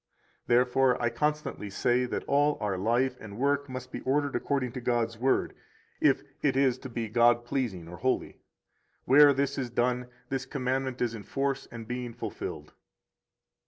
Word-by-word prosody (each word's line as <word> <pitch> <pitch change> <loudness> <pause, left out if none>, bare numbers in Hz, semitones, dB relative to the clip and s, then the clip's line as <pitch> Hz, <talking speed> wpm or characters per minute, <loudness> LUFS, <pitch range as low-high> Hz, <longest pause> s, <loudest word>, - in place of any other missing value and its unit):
92 120 - +5
Therefore 125 +1 +3
I 120 - +1
constantly 150 -5 -2
say 120 +5 +1
that 125 - -3
all 145 +1 +2
our 105 -3 -1
life 120 +7 +1
and 100 -1 -9
work 140 +2 +1
must 130 0 -7
be - - -5
ordered 140 +1 0
according 135 -4 -1
to 130 - -6
God's 115 -2 0
Word, 130 +2 +1 0.5
if - - +3 0.2
it 135 -2 +2
is 130 -2 +3
to 130 - -8
be 115 -1 -3
God 120 +2 +4
pleasing 115 -10 -2
or 90 +1 -9
holy. 130 +5 -1 0.7
Where 145 +2 +8
this 140 0 0
is 125 -2 -2
done, 125 +1 0 0.2
this 130 -1 -3
commandment 130 -1 -1
is 120 -2 -1
in 110 - -6
force 135 +5 -2
and 115 -2 -8
being 125 -1 -4
fulfilled. 120 - -6
125 Hz, 170 wpm, -29 LUFS, 120-135 Hz, 0.7 s, Where